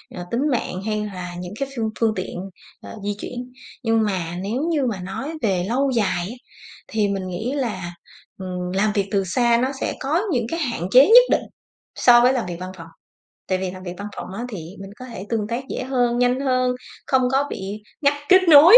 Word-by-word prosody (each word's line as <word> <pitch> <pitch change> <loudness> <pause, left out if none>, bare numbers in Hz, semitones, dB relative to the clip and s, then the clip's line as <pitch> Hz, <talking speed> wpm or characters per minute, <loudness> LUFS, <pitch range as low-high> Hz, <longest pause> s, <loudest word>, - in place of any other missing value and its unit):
ờ, 175 -1 -5
tính 235 - 0
mạng 205 -6 -1
hay 215 -1 -1
là 180 -3 -6
những 180 +2 -6
cái 275 - -2
phương 225 -3 -1
phương 225 -2 +3
tiện, 185 -1 -4 0.4
ờ, - - -9
di 205 0 -1
chuyển. 250 +2 -6 0.3
Nhưng 225 -1 +3
mà 180 -4 -2
nếu 225 +7 -1
như 295 -5 +1
mà 215 -6 -1
nói 195 - -5
về 190 -6 +1
lâu 270 +3 +2
dài 205 -7 +1
á 240 - -7 0.5
thì 215 -2 +1
mình 195 -2 -2
nghĩ 190 +7 -3
là, 195 -10 -3 0.5
ừm, 180 -1 -4
làm 210 +3 +2
việc 200 -2 0
từ 200 -1 +2
xa 235 +5 +3
nó 255 - +2
sẽ - - 0
có 305 +6 +1
những 245 -5 +1
cái 330 - -2
hạn 240 - -2
chế 260 +3 +9
nhất 485 +4 +10
định - - +4 0.5
so 240 -1 +7
với 250 +2 +5
làm 250 -3 -1
việc 175 -1 -5
văn 185 +1 -6
phòng 165 -1 -9 0.6
tại 185 - +1
vì 185 0 -2
làm 185 0 -9
việc 175 -1 -6
văn 200 +1 -5
phòng - - -5
á 230 +4 -4
thì 210 -6 -6 0.2
mình 195 0 -8
có 255 - -8
thể 230 -6 -8
tương 220 -3 -1
tác 240 +3 -3
dễ - - -3
hơn, 245 -2 +1
nhanh 250 +1 +2
hơn, 255 -2 +2 0.3
không 265 -1 +3
có 270 +1 +3
bị 200 +2 -5 0.2
ngắt 285 -1 +4
kết 375 0 +8
nối, 320 +9 +10
225 Hz, 225 wpm, -22 LUFS, 190-255 Hz, 0.6 s, nhất